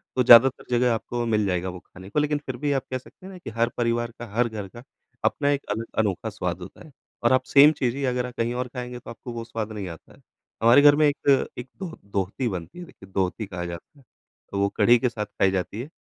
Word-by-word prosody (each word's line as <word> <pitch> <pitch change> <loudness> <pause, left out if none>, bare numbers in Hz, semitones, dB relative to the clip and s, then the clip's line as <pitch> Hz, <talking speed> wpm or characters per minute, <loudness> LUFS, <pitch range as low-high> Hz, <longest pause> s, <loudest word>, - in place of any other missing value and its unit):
तो 125 - +3
ज़्यादातर 120 +2 +7
जगह 120 0 +3
आपको 120 +1 -3
मिल 105 -2 +1
जाएगा 90 -1 -1
वो 90 0 -8
खाने 95 +2 -14
को, 150 - 0
लेकिन 150 0 +1
फिर 130 -2 -5
भी 145 +2 -1
आप 135 -2 0
कह 130 - 0
सकते 155 +8 -16
हैं 195 - -9
ना - - -9
कि 175 - -8
हर 115 +1 0
परिवार 120 0 0
का, 120 - -6
हर 120 +1 +2
घर 105 -3 -6
का 120 +5 -13 0.4
अपना 145 - +1
एक 140 0 -1
अल 110 +2 -2 0.2
अनोखा 100 -5 0
स्वाद - - -3
होता - - -11
है 155 - -15 0.3
और 120 +2 +4
आप 130 - +3
सेम 145 +2 +7
चीज़ 130 -4 -1
ही 140 - -4
अगर 125 -1 0
आप 125 - -7
कहीं 115 +1 0
और 125 0 -2
खाएँगे 125 0 -7
तो - - -12
आपको 120 +1 -8
वो 115 - -5
स्वाद 115 -1 -5
नहीं 105 -3 -5
आता 80 -2 -12
है। - - -21 0.4
हमारे 120 +5 +7
घर 145 0 +7
में 155 - +4
एक, 140 -2 +2
एक 125 +1 -6
दोह 175 -3 -6
दोहती 100 +5 -2
बनती 90 - -6
है 175 - -7
देखिए 95 - -16
दोहती 95 +3 -1
कहा 90 -3 -5
जाता 85 - -9
है, - - -21 0.5
तो 100 - -2
वो 100 0 +2
कढ़ी 120 +1 +6
के 125 - +1
साथ 110 -2 -4
खाई 95 -2 +1
जाती 95 +4 -3
है। 140 - -8
120 Hz, 260 wpm, -25 LUFS, 105-130 Hz, 0.5 s, ज़्यादातर